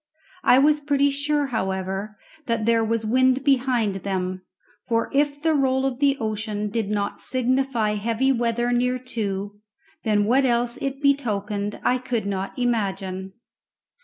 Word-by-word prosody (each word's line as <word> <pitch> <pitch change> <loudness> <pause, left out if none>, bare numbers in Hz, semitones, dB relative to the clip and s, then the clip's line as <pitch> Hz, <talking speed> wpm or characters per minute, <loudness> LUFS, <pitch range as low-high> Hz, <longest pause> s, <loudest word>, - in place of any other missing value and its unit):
I 250 - +6
was 295 +2 +4
pretty 285 -1 +2
sure, 290 +1 0
however, 190 +1 -2 0.3
that 230 -2 0
there 230 0 +3
was 225 0 -1
wind 255 +3 +3
behind 250 -7 +2
them, 185 -1 -3 0.5
for 230 -1 0
if 285 +1 +1
the 320 -1 +3
roll 265 -2 +2
of 265 -2 -2
the 280 -1 +3
ocean 215 -1 -3
did 220 -2 -1
not 205 -1 -2
signify 255 -3 0
heavy 230 +5 +1
weather 240 -1 0
near 250 +1 +1
to, 205 -5 -4 0.4
then 210 -2 +2
what 255 +5 +3
else 240 -1 +1
it 275 +1 -4
betokened 210 -7 0
I 250 - +2
could 240 -4 -2
not 195 -1 -3
imagine. 195 -6 -2
235 Hz, 145 wpm, -24 LUFS, 205-265 Hz, 0.5 s, I